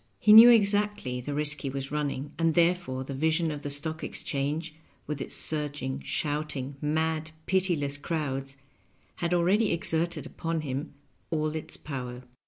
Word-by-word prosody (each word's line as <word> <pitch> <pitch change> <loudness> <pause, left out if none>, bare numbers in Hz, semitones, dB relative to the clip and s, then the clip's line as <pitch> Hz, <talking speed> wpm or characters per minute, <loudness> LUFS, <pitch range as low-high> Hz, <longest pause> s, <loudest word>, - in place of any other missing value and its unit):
He 210 - +5
knew 225 +2 +11
exactly 205 - +2
the 145 +3 -4
risk 150 -1 +1
he 135 - -3
was 135 +1 -5
running, 145 -1 -3
and 165 -1 +2
therefore 170 -6 +1
the 135 - -6
vision 160 +3 +1
of 150 -1 -6
the 145 - -5
Stock 155 +3 +1
Exchange, 150 +3 -3 0.3
with 150 -2 -4
its - - -1
surging, 145 -3 -1
shouting, 145 -3 -3
mad, 160 +1 -1 0.2
pitiless 175 -7 0
crowds, 140 -3 -4 0.6
had 170 0 -2
already 190 +5 +2
exerted 165 -2 0
upon 165 0 -3
him 140 +1 -5 0.4
aU 155 -1 0
its 155 0 -6
power. 125 -3 -6
150 Hz, 150 wpm, -28 LUFS, 140-165 Hz, 0.6 s, knew